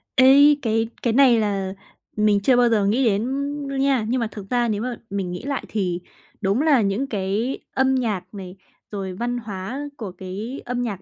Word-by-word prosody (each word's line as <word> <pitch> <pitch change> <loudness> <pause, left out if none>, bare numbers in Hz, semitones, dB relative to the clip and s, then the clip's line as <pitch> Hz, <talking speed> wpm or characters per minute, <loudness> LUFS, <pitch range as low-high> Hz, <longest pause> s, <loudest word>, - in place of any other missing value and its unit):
Ê, 280 +3 +7
cái 225 -1 0
cái 235 - +1
này 250 -2 +6
là 195 -3 -1 0.4
mình 210 -1 +3
chưa 250 +6 +3
bao 245 -1 +5
giờ 215 -3 +2
nghĩ 235 +6 +2
đến 210 -2 +2 0.4
đâu 275 0 -4
nha. 270 -4 +2
Nhưng 255 +2 +1
mà 230 - 0
thực 200 -2 -9
ra, 240 -1 +1
nếu 210 -2 -1
mà 250 +1 -3
mình 195 -2 -3
nghĩ 180 - -6
lại 275 0 -3
thì, 180 -4 -2 0.4
đúng 200 +5 +1
là 295 -6 +4
những 205 +7 0
cái 210 +4 -2
âm 265 0 +2
nhạc 210 -7 -2
này, 190 -2 -8 0.4
rồi 195 -3 -4
văn 240 +5 -2
hóa 215 +2 -5 0.2
của 205 -5 -6
cái 195 +8 -7
âm 245 0 -2
nhạc 205 -6 -3
225 Hz, 200 wpm, -22 LUFS, 195-255 Hz, 0.4 s, Ê